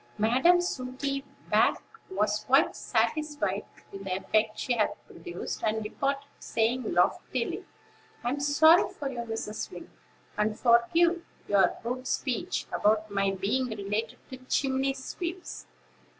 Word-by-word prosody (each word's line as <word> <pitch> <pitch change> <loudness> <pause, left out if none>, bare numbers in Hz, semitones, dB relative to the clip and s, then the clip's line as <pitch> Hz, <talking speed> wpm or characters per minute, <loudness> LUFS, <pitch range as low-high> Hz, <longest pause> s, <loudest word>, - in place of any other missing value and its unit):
Madam 255 +12 +4
Sooty 275 -3 -3 0.3
back - - +4 0.3
was 210 - 0
quite 270 +2 +4
satisfied 290 -11 -1 0.3
with 195 0 -8
the 185 -1 -2
effect 215 +2 +1
she 250 - 0
had 215 -2 +1
produced, 170 +1 -6
and 220 0 0
departed, 275 +6 -2
saying 235 +1 0
loftily: 175 +1 0 0.6
"I'm 250 +4 -1
sorry 310 +4 +5
for 280 -2 -5
you, 245 - -6
Mrs. 225 -2 -4
Wing, - - -10 0.5
and 210 0 0
forgive 330 +9 +4 0.2
your 200 -1 +3
rude 250 +2 -3
speech 290 +8 -1
about 215 0 +2
my 195 0 +1
being 200 +7 0
related 215 +2 -3
to 260 - -6
chimney 265 +1 0
sweeps. 345 +6 -6
245 Hz, 125 wpm, -28 LUFS, 215-275 Hz, 0.6 s, sorry